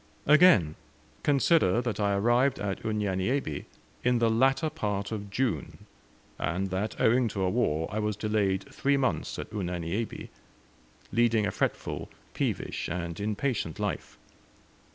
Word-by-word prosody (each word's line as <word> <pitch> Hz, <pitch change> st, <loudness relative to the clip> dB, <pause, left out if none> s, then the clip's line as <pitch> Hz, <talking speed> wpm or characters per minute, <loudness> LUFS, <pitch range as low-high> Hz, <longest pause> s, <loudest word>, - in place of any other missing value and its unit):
Again, 145 Hz, -, +6 dB, 0.4 s
consider 140 Hz, -, +3 dB
that 120 Hz, -4 st, -2 dB
I 100 Hz, -1 st, +2 dB
arrived 120 Hz, +6 st, +3 dB
at 100 Hz, -2 st, -3 dB
Unyanyembe 105 Hz, -, -1 dB, 0.4 s
in 125 Hz, 0 st, +3 dB
the 115 Hz, -1 st, +3 dB
latter 135 Hz, +7 st, +2 dB
part 105 Hz, -9 st, -2 dB
of 105 Hz, -2 st, -5 dB
June, 105 Hz, -, -2 dB, 0.5 s
and 95 Hz, +2 st, -1 dB
that 100 Hz, +4 st, -2 dB
owing 120 Hz, +2 st, +4 dB
to 100 Hz, -3 st, -2 dB
a 95 Hz, -, +2 dB
war 80 Hz, -9 st, +1 dB
I 105 Hz, -, -2 dB
was 105 Hz, -1 st, -1 dB
delayed 100 Hz, -2 st, 0 dB
three 140 Hz, 0 st, +2 dB
months 130 Hz, -2 st, -1 dB
at -, -, -6 dB
Unyanyembe, 90 Hz, +1 st, -3 dB, 0.8 s
leading 115 Hz, -2 st, +3 dB
a 100 Hz, -, 0 dB
fretful, -, -, -2 dB, 0.2 s
peevish -, -, -2 dB
and 85 Hz, -1 st, -4 dB
impatient 105 Hz, -, -2 dB
life. -, -, -3 dB
105 Hz, 130 wpm, -28 LUFS, 95-120 Hz, 0.8 s, Again